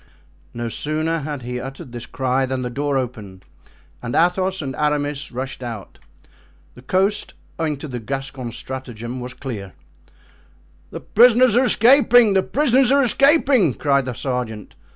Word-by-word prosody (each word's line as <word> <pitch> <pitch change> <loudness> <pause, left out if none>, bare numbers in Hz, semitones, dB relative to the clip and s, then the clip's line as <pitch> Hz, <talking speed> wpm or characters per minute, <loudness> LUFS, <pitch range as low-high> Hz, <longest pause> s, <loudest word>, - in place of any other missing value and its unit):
No 120 0 -5
sooner 155 +6 -2
had 145 -3 -5
he 125 +1 -4
uttered 135 -1 -8
this 120 -1 -8
cry 130 0 -1
than 130 0 -3
the 125 - -4
door 140 +1 -1
opened 105 -7 -6 0.6
and 120 0 -4
Athos 185 +2 +1
and 135 -4 -5
Aramis 145 -1 -1
rushed 130 +1 -6
out. 115 -5 -8 0.7
The 125 - -14
coast, 195 +9 0 0.2
owing 155 -3 -1
to 150 - -7
the 125 -3 -5
Gascon's 135 0 -5
stratagem, 125 -2 -7
was 125 0 -7
clear. 105 - -7 1.2
"The - - -8
prisoners 245 +1 +5
are 255 +2 +4
escaping! 245 -2 +5
the 190 - +3
prisoners 265 +2 +2
are 280 0 +4
escaping!" 270 - +3
cried 140 -2 +1
the 130 - -4
sergeant. 120 -4 -4
135 Hz, 150 wpm, -21 LUFS, 125-190 Hz, 1.2 s, prisoners